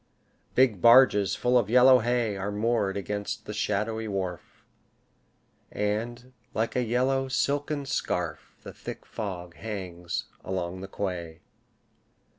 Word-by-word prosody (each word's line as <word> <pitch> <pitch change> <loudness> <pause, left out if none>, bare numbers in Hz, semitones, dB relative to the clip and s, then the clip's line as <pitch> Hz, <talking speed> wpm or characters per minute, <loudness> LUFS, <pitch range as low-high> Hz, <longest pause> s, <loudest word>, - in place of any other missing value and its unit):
Big 120 -8 +3
barges 115 -6 +6
full 125 0 +3
of 105 -3 -2
yellow 125 +2 +7
hay 120 -2 0
Are 95 +1 -3
moored 105 -2 0
against 105 +3 -4
the 105 - -5
shadowy 110 +2 -1
wharf, 95 -4 -5 1.1
And, 120 +5 -3 0.2
like 110 +1 -1
a 125 - +2
yellow 130 +3 +1
silken 145 +2 -1
scarf, 90 - -3
The - - -9
thick - - -8
fog 90 -5 -6
hangs 90 -5 -5 0.2
along 95 -1 -3
the 95 - -6
quay. 90 -5 -4
105 Hz, 120 wpm, -27 LUFS, 95-125 Hz, 1.1 s, yellow